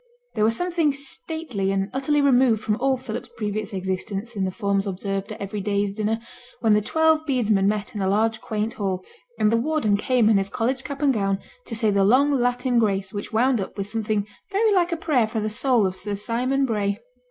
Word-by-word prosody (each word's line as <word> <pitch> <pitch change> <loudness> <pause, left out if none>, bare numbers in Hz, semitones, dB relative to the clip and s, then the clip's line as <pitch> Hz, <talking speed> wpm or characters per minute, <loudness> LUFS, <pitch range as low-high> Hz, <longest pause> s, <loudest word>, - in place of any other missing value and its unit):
There 215 - 0
was 225 +1 +2
something 340 -5 +1
stately 275 -6 -3
and 195 +1 -1
utterly 290 +2 +1
removed 250 -5 +4
from 210 - +1
all 265 0 +1
Philip's 240 -2 -6
previous 215 -1 -3
existence 195 +4 -3
in 195 -2 0
the - - 0
forms 200 -1 0
observed 195 +2 -3
at 215 - -7
every 200 +1 -4
day's 200 0 0
dinner, 215 +2 -1 0.4
when 225 -3 +3
the 210 - +4
twelve 320 +6 +2
bedesmen 215 -7 +2
met 210 0 -1
in 210 - -5
the 190 - 0
large 220 +3 +1
quaint 215 0 -2
hall, 190 -3 -3 0.3
and 210 - +3
the 230 - +3
warden 245 -5 +1
came 240 +1 +2
in 220 -2 +5
his 195 0 0
college 250 +5 -1
cap 280 +1 -5
and 275 -2 +4
gown 195 -3 0 0.3
to 230 - -4
say 220 -1 +2
the 200 -1 +3
long 260 +8 +4
Latin 245 -1 +1
grace 195 -3 0
which 205 0 -5
wound 240 +1 +2
up 190 - -7
with 200 +1 -4
something 215 -2 -1 0.3
very 425 +2 +3
like 355 -2 +2
a 335 - 0
prayer 275 -9 +2
for 220 0 -3
the 215 0 -2
soul 250 -1 +2
of 185 -1 -1
Sir 205 +1 -3
Simon 250 +6 0
Bray. 205 -4 -1
220 Hz, 215 wpm, -24 LUFS, 200-260 Hz, 0.4 s, in